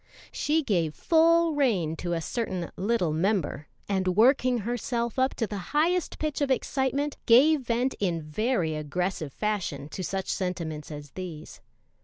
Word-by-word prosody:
She 310 +2 +1
gave 170 - 0
full 335 0 +4
rein 205 - +1
to 175 +1 -3
a 165 - -1
certain 185 -3 -3
"little 195 -5 0
member," 165 -4 0 0.2
and 185 -2 0
working 255 +2 +4
herself 235 +1 -2
up 260 +1 +2
to 230 - 0
the 205 -1 -5 0.2
highest 345 +3 +1
pitch 305 -2 -2
of 285 - +1
excitement, 270 +2 0
gave 280 +6 +6
vent 245 +2 0
in 175 -5 0
very 170 +1 0
aggressive 155 +1 -3
fashion 170 -8 -3
to 185 - -5
such 190 +1 -3
sentiments 170 -5 -3
as 145 -2 -8
these. 170 -4 -8
205 Hz, 150 wpm, -27 LUFS, 170-260 Hz, 0.2 s, gave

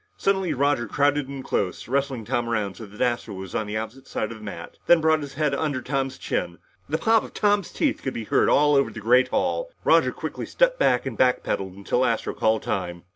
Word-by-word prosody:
Suddenly, 190 -5 +1
Roger 135 -3 +1
crowded 145 +3 +1
in 135 -1 -6
close, 95 -7 -2
wrestling 135 -3 -1
Tom 120 0 -1
around 105 -4 -1
so 110 +2 -10
that 105 +2 -11
Astro 120 -4 -1
was 95 -1 -8
on 110 - -1
the 105 +1 -3
opposite 110 +5 -7
side 110 - -3
of 115 - -8
the - - -13
mat, 90 -5 -8
then 175 - +7
brought 160 0 +3
up - - -7
his 140 -2 -8
head 150 -1 +1
under 140 -2 -1
Tom's 135 +1 -2
chin. - - -3 0.3
The 155 - +1
pop 225 +6 +3
of - - -11
Tom's 205 -3 +1
teeth 290 -3 0
could 135 - -4
be 115 - -3
heard - - +2
all 145 0 +4
over 140 -1 +3
the - - -8
great 125 +4 +4
hall. 385 - -1
Roger - - +4
quickly - - -6
stepped - - +2
back, 125 - +3
and 130 -4 -4
back 125 +2 +2
pedaled 95 -1 -2
until 100 +6 0
Astro 115 -3 0
called 110 0 +1
time. 85 -3 -3
130 Hz, 235 wpm, -24 LUFS, 110-145 Hz, 0.3 s, then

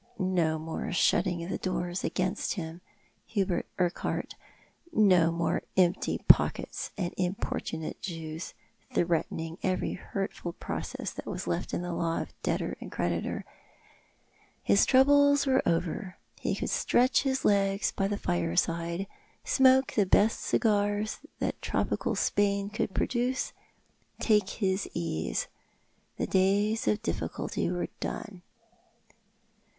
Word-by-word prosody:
Ko 180 -5 +1
more 160 +1 -4
shutting 175 0 +2
of 180 - -4
doors 180 -1 -2
against 185 0 -1
him, 165 -2 -6 0.5
Hubert 195 -5 0
Urquhart; 180 -1 -1 0.6
no 185 - +5
more 170 0 0 0.2
empty 180 +1 +2
pockets - - +4
and 180 -3 -2
importunate 180 -3 -3
Jews, 165 -2 -6 0.4
threatening 165 0 -1
every 185 -1 0
hurtful 190 -2 -4
proce.ss - - -5
that - - -8
was - - -4
left 85 -1 -2
in - - -2
the 175 -1 -3
law 165 -1 0
of - - -6
debtor - - -1
and - - -8
creditor. 85 -1 -2 1.2
His 100 - +4
troubles 285 +2 +5
were 265 -1 +3
over. 180 +3 -1 0.2
He - - -1
could - - -3
stretch 250 +2 +3
his 265 -1 -1
legs 195 -1 +2
by 195 - 0
his 205 0 -2
fireside, 165 - 0 0.4
smoke 265 0 +4
the 205 -3 +2
best 210 +4 +4
cigars 205 0 +1 0.2
that - - -2
tropical - - -1
Spain 200 0 +1
could 205 -2 -2
produce, 250 +1 0 0.7
take 210 -3 +3
his 195 -2 -1
ease. 125 - -1 0.7
The - - 0
days 200 +4 +2
of 215 +1 +1
difficulty 225 - -2
were 175 0 -2
done. 195 -5 -5
185 Hz, 120 wpm, -29 LUFS, 170-210 Hz, 1.2 s, no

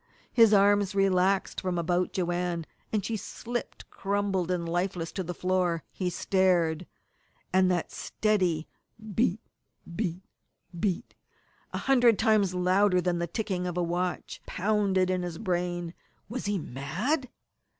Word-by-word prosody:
His 225 -3 +7
arms 205 -1 +4
relaxed 195 0 +2
from 185 -2 -1
about 175 +1 +1
Joanne, 175 -2 -1 0.3
and 210 -3 0
she 225 - -1
slipped 240 +3 -5
crumpled 195 -3 -1
and 175 -2 -1
lifeless 175 -1 -1
to 190 - -3
the 175 0 -5
floor. 180 -2 0
He 185 -2 -2
stared 175 -3 +1 0.7
and 185 0 +5
that 175 -2 0
steady 185 -7 0 0.5
beat 220 -1 +1 0.5
beat 185 -3 -2 0.6
beat 195 -3 -1 0.6
a - - -3
hundred 245 -5 +4
times 205 -4 +3
louder 185 +1 +3
than 175 -1 0
the 170 - -1
ticking 180 -1 -2
of 180 0 -4
a 180 - +2
watch 175 +1 -2
pounded 195 -2 +1
in 185 -1 0
his 175 -2 -4
brain. 175 -3 -2 0.3
Was 235 -1 -4
he 205 -1 +1
mad? 190 - -2
185 Hz, 135 wpm, -28 LUFS, 175-205 Hz, 0.7 s, His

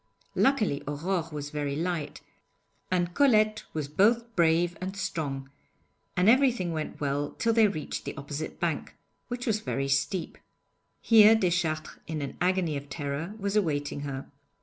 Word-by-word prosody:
Luckily 220 - +2
Aurore 165 +3 -2
was 145 -1 -5
very 145 -2 -2
light, 165 -2 -3 0.7
and 175 -1 0
Colette 215 -6 +3
was 155 -3 -3
both 230 +9 +2
brave 170 0 +3
and 190 +2 -4
strong, 140 -8 -3 0.7
and 180 +2 +3
everything 245 -7 +4
went 155 -1 -4
well 145 0 -2
till 230 0 +2
they 225 -1 +6
reached 155 -7 -4
the - - -5
opposite 145 +2 -5
bank, - - -2 0.3
which 245 0 -4
was 220 -3 +1
very 135 -10 -2
steep. 140 +6 -1 0.6
Here 220 -1 +7
Deschartres 170 -6 -1
in 155 -2 -3
an 140 - -5
agony 180 -3 +1
of 140 0 -9
terror, 145 +6 -4
was 200 -1 -2
awaiting 145 -8 0
her. 140 -2 -5
170 Hz, 150 wpm, -28 LUFS, 145-210 Hz, 0.7 s, Here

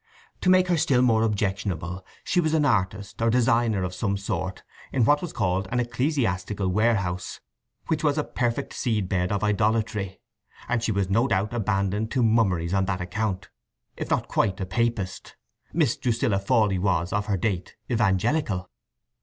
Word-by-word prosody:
To 185 - +2
make 185 0 +5
her 175 - +3
still 135 -6 +3
more 115 -3 +4
objectionable, 95 -4 -1 0.2
she 180 - +1
was 160 -1 +1
an 150 -2 +3
artist 100 -4 -1
or 115 - +3
designer 115 -4 +2
of 90 0 -3
some 100 -1 -1
sort 95 -1 -4 0.3
in 125 -4 +2
what 145 +4 +4
was 175 - -4
called 95 +1 0
an 125 - +1
ecclesiastical 115 - -1
warehouse, 100 -3 0 0.5
which 160 -1 -1
was 150 -1 +2
a 150 - +1
perfect 125 +1 -2
seed 110 -7 -1
bed 90 0 0
of 100 0 -1
idolatry, 105 -1 0 0.5
and 125 -1 0
she 115 - 0
was 100 -2 -1
no 115 +6 +3
doubt 100 0 0
abandoned 105 -1 0
to 130 -2 +2
mummeries 95 -7 +2
on 95 -1 +2
that 95 -1 -2
account—if 95 +2 -5
not - - 0
quite 95 0 0
a 95 - -2
Papist. 110 -1 -2 0.4
(Miss 150 -8 +2
Drusilla 115 -4 +1
Fawley 100 -2 +2
was 90 -2 0
of 105 0 -1
her 100 -2 +1
date, 95 -2 -2 0.2
Evangelical.) 110 - +1
105 Hz, 165 wpm, -25 LUFS, 95-120 Hz, 0.5 s, make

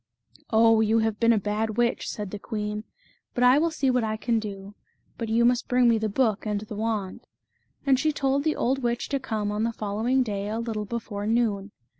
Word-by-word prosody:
" - - -26
O, 225 0 +5
you 220 +1 +3
have 220 -1 0
been 230 0 +4
a 230 - +4
bad 210 +2 -2
witch", 240 0 +1
said 205 -3 -5
the 210 - -5
queen, 210 0 -4 0.2
" - - -38
but 245 - +1
I 250 +3 +6
will 335 +2 +2
see 275 -4 0
what 250 -2 +1
I 220 0 -1
can 230 0 0
do; 200 -2 -7 0.5
but 230 -2 -3
you 230 +1 +3
must 245 0 +2
bring 250 -1 +3
me 230 -1 +4
the 215 0 -1
book 215 -1 +1
and 210 -2 -1
the 215 0 -8
wand"; 215 -3 -3 0.6
and 270 -2 +4
she 310 +2 +2
told 280 -1 0
the 310 0 +1
<51d 265 +3 0
witch 240 -2 -2
to 275 - 0
come 215 -5 -2
on 210 +1 -2
the 230 +1 +1
following 225 +5 0
day 205 -3 -3
a 220 - -2
little 225 -2 -3
before 210 -2 -4
noon. 215 -3 +1
225 Hz, 230 wpm, -26 LUFS, 210-245 Hz, 0.6 s, I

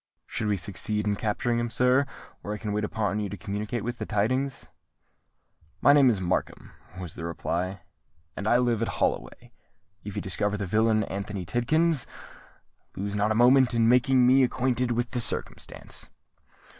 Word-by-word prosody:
"Should 105 0 -3
we 105 -1 +1
succeed 105 +3 -1
in 105 -1 +1
capturing 115 +3 -1
him, 120 0 -2
sir, 125 +4 +3 0.3
where 105 +1 -4
can 105 0 -5
I - - -2
wait 105 +1 -1
upon 105 0 -1
you 105 -1 -3
to 100 - -6
communicate 105 +6 -4
the 120 0 -4
tidings?" 130 +6 -1 1.1
"My 145 - +6
name 140 -3 +6
is 110 -5 +1
Markham," 90 0 -2 0.3
was 90 -3 -7
the - - -8
reply, 85 +2 -3 0.5
"and 100 - -4
I 120 - +5
live 120 -3 +1
at 115 - 0
Holloway. - - -2 0.5
If 105 -1 -7
you - - -2
discover 105 +2 -1
the 100 - -3
villain 110 +3 +2
Anthony 100 -2 -5
Tidkins, 155 - +1 0.9
lose 100 +1 -4
not 105 +1 +1
a - - +1
moment 125 +1 +5
in 115 -1 +3
making 125 +1 +4
me 130 +2 +5
acquainted 125 -1 0
with 120 +1 -1
the 125 - 0
circumstance." 115 - 0
110 Hz, 170 wpm, -26 LUFS, 100-125 Hz, 1.1 s, My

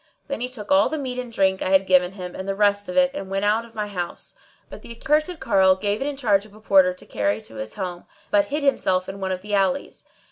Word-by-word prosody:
Then 280 - -3
he 250 - -1
took 230 -2 -9
all 290 +1 +5
the 315 - -2
meat 255 -3 -4
and 250 -2 -6
drink 190 -3 +1
I - - -1
had 190 0 +4
given 185 0 +3
him 180 -2 -7
and 190 +1 -6
the 195 - -1
rest 205 -1 +2
of 180 - -4
it 270 0 +5
and 195 -10 -6
went 195 +1 -1
out 220 +3 +2
of 230 - -18
my 210 -1 -2
house; 180 -4 -6 0.3
but - - -11
the - - -11
accursed 305 +6 0
carle 190 -3 +4
gave 205 +3 -2
it 275 - -1
in 290 -1 -4
charge 205 -7 +2
of 210 -1 -16
a - - -14
porter 190 -4 +4
to - - -12
carry 100 +1 -1
to 110 - -12
his 110 0 -6
home 180 -3 -5 0.3
but 205 -1 +4
hid 290 +7 -3
himself 185 -9 +1
in 195 +1 -7
one 190 0 -2
of 185 0 -4
the 210 0 -6
alleys. 205 +8 0
200 Hz, 275 wpm, -23 LUFS, 190-245 Hz, 0.3 s, all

